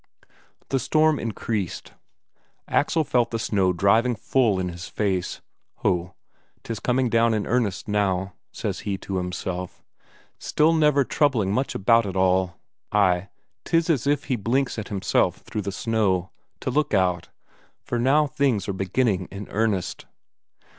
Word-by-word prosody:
The 135 Hz, -, +1 dB
storm 155 Hz, +2 st, +2 dB
increased, 110 Hz, -4 st, -4 dB, 0.7 s
Axel 160 Hz, +2 st, +2 dB
felt 125 Hz, -4 st, +1 dB
the 115 Hz, -, -2 dB
snow 100 Hz, -4 st, +1 dB
driving 110 Hz, +7 st, +3 dB
full 115 Hz, -4 st, +1 dB
in 90 Hz, -1 st, -1 dB
his 85 Hz, +1 st, -8 dB
face. 95 Hz, -4 st, -2 dB, 0.4 s
Ho, 90 Hz, 0 st, 0 dB, 0.5 s
'tis 115 Hz, -3 st, -5 dB
coming 125 Hz, +3 st, +1 dB
down 115 Hz, 0 st, +3 dB
in 105 Hz, -, -1 dB
earnest 110 Hz, -7 st, -1 dB
now, 95 Hz, -2 st, 0 dB, 0.2 s
says -, -, -4 dB
he 100 Hz, -2 st, -3 dB
to 95 Hz, 0 st, -4 dB
himself, 90 Hz, 0 st, -4 dB, 0.6 s
still 155 Hz, +2 st, +2 dB
never 150 Hz, -3 st, +4 dB
troubling 120 Hz, -10 st, +1 dB
much 130 Hz, +4 st, -1 dB
about 115 Hz, +2 st, +3 dB
it 95 Hz, -, -5 dB
all 95 Hz, -1 st, +2 dB, 0.4 s
ay, 100 Hz, -2 st, +2 dB, 0.3 s
'tis 165 Hz, 0 st, +2 dB
as 140 Hz, -3 st, 0 dB
if 145 Hz, 0 st, +2 dB
he 130 Hz, -, -1 dB
blinks 120 Hz, +3 st, 0 dB
at 110 Hz, -, -6 dB
himself 100 Hz, -2 st, 0 dB
through 105 Hz, -, -4 dB
the 100 Hz, 0 st, -4 dB
snow, 95 Hz, -4 st, 0 dB, 0.3 s
to -, -, -2 dB
look 145 Hz, -4 st, +1 dB
out, 90 Hz, -3 st, +1 dB, 0.5 s
for 120 Hz, -, -2 dB
now 140 Hz, +5 st, +4 dB
things 135 Hz, -6 st, 0 dB
are 100 Hz, -, -1 dB
beginning 95 Hz, 0 st, 0 dB
in 100 Hz, 0 st, -8 dB
earnest! 105 Hz, -4 st, -1 dB
105 Hz, 145 wpm, -24 LUFS, 95-125 Hz, 0.7 s, never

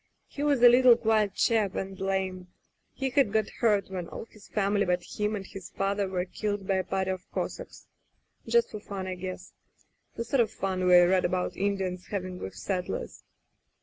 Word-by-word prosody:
He 285 Hz, -, -8 dB
was 285 Hz, -4 st, +2 dB
a -, -, +11 dB
little 245 Hz, 0 st, +7 dB
quiet 215 Hz, -4 st, +1 dB
chap 215 Hz, -4 st, +2 dB
and 195 Hz, 0 st, -4 dB
lame. 190 Hz, -1 st, -2 dB, 0.4 s
He 265 Hz, -1 st, -3 dB
had 270 Hz, -6 st, +3 dB
got 220 Hz, -1 st, 0 dB
hurt 205 Hz, -5 st, +2 dB
when 180 Hz, -3 st, -4 dB
all -, -, -7 dB
his 215 Hz, -2 st, -17 dB
family 205 Hz, -1 st, +1 dB
but 180 Hz, -1 st, 0 dB
him 210 Hz, +3 st, -2 dB
and 195 Hz, -2 st, -5 dB
his 195 Hz, -2 st, -9 dB
father 195 Hz, 0 st, -1 dB
were 180 Hz, -1 st, -1 dB
killed 205 Hz, +1 st, -3 dB
by 195 Hz, 0 st, +1 dB
a 185 Hz, -, 0 dB
party 190 Hz, 0 st, -1 dB
of 185 Hz, 0 st, -6 dB
Cossacks -, -, -5 dB, 0.3 s
— -, -, -37 dB
^just 470 Hz, 0 st, +3 dB
for 210 Hz, -, -6 dB
fun, 200 Hz, -2 st, -6 dB
I 185 Hz, -, -3 dB
guess. 185 Hz, 0 st, -7 dB, 0.6 s
The 230 Hz, -, -2 dB
sort 250 Hz, +3 st, 0 dB
of 230 Hz, -3 st, +4 dB
fun 190 Hz, -3 st, -2 dB
we 180 Hz, 0 st, +8 dB
read 180 Hz, +1 st, +4 dB
about 180 Hz, -1 st, -1 dB
Indians 190 Hz, -2 st, -2 dB
having 185 Hz, -2 st, -4 dB
with 95 Hz, -, -7 dB
setders. 185 Hz, -2 st, -4 dB
195 Hz, 195 wpm, -28 LUFS, 185-215 Hz, 0.6 s, a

